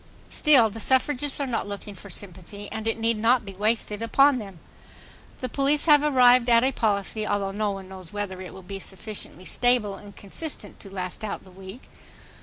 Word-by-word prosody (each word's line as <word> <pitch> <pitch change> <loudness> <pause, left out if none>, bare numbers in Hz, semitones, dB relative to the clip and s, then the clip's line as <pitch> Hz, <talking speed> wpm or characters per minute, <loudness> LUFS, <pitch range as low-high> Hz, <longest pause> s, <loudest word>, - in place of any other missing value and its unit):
Still, 260 -8 +5
the 225 - -8
suffragists 270 +4 +1
are 280 - 0
not 235 -5 -2
looking 205 0 -6
for 200 +1 -12
sympathy, 195 +2 -5
and 220 0 -4
it 225 - 0
need 225 -1 0
not 230 +1 +3
be 195 - -8
wasted 210 +1 0
upon 275 +4 +4
them. 195 -6 -9 0.8
The 255 - -1
police 280 +3 +1
have 295 -3 +7
arrived 250 -4 +5
at 235 0 +6
a 265 - +3
policy, 215 -2 -1
although 200 -1 0
no 210 +1 -1
one 195 -1 -6
knows 185 -3 -9
whether 200 -3 -4
it 185 - -8
will 190 - -11
be 195 +2 -7
sufficiently 190 -1 -8
stable 245 -4 +1
and 200 0 -12
consistent 210 - -4
to 195 - -11
last 185 +1 -5
out 210 - -4
the 185 - -16
week 190 +6 -11
215 Hz, 195 wpm, -25 LUFS, 195-250 Hz, 0.8 s, have